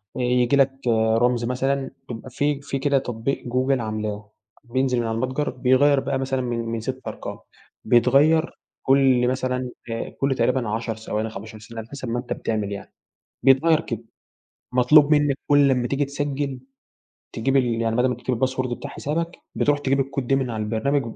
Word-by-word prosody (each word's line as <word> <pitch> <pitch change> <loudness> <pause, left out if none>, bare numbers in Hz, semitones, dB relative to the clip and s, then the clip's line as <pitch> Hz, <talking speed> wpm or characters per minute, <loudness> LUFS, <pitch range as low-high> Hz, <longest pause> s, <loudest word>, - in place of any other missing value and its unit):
ييجي 125 +1 +2
لك 135 -1 +4 0.2
آآ، 110 -1 +3
رمز 120 0 +2
مثلًا 135 +2 -1 0.2
بيبقى 120 +1 -7
في 145 +3 -1
في 140 -1 -3
كده 140 0 +2
تطبيق 125 +1 -2
جوجل 130 +1 +1
عاملاه، 105 -1 -4 0.3
بينزِل 130 0 0
من 115 - -1
على 110 - -1
المتجر 130 +5 -1
بيغيّر 135 +3 +3
بقى 135 0 -2
مثلًا 135 0 -1
من 120 -2 -2
من 115 0 -3
6 130 +2 -5
أرقام - - -7 0.5
بيتغيّر 145 +7 +3 0.2
كلّ 130 -2 +4
مثلًا 130 0 -1 0.2
آآ، 115 - -3
كلّ 135 -1 -1
تقريبًا 120 -1 +1
10 115 +1 -2
ثواني، 110 0 -3
15 110 +1 -9
ثانية، 115 +2 -9
على 110 - -13
حسَب 140 -3 -6
ما 120 +1 -1
أنت 120 - -4
بتعمِل 105 -3 -2
يعني، 100 - -7 0.5
بيتغيّر 150 +5 +5
كده، 115 -5 -5 0.7
مطلوب 145 +4 +5
منك 145 -2 +3
كلّ 145 -1 +5
أمّا 125 -2 +1
تيجي 140 +1 0
تسجّل 140 -1 -3 0.7
تجيب 135 +4 0
ال 130 - +4 0.2
يعني 115 0 0
بدل 125 +1 +3
ما 125 - 0
تكتِب 125 +2 -2
الباسورد 130 +1 -1
بتاع - - -7
حسابك 165 +4 -3 0.2
بتروح 145 0 +2
تجيب 135 -1 +1
الكود 135 -1 -2
دي 135 +2 +3
من 130 -2 -1
على 110 -2 -3
البرنامج 115 +7 0
130 Hz, 180 wpm, -23 LUFS, 115-140 Hz, 0.7 s, بيتغيّر